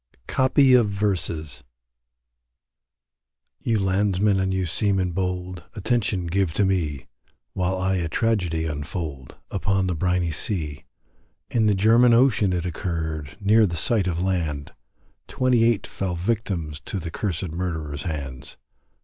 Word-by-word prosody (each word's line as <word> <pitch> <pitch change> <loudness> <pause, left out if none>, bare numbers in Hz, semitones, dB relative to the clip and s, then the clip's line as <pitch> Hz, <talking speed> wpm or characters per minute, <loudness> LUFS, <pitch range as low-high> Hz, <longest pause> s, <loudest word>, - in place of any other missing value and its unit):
COPY 130 0 +4
OF 120 -4 +5
VERSES. 85 -9 -2 2.0
You 115 -2 0
landsmen 95 +1 +2
and 95 0 0
you 95 -1 0
seamen 95 +1 0
bold, 90 0 -3
Attention 105 -4 0
give 90 0 0
to 100 - +2
me, 80 -8 -1 0.5
While 95 0 0
I 95 +1 0
a 85 -2 -2
tragedy 90 -7 0
unfold, 75 -2 -5 0.2
Upon 95 -1 0
the 90 - 0
briney 90 0 0
sea; 75 -3 -4 0.7
In 110 -2 +2
the 105 - +3
German 115 +4 +5
ocean 115 -6 +4
it 90 -1 -1
occurred, 80 -5 -4
Near 105 +2 +4
the 85 -2 -4
sight 100 +3 +1
of 85 -2 -1
land, 85 -6 -2 0.5
Twenty 125 -2 +2
eight 115 -3 +2
fell 95 -3 -3
victims 90 -6 -2
To 100 - -3
the 85 -3 -5
cursed 90 -2 -3
murderers 80 -4 -3
hands. 70 -5 -6
95 Hz, 130 wpm, -24 LUFS, 80-105 Hz, 2.0 s, OF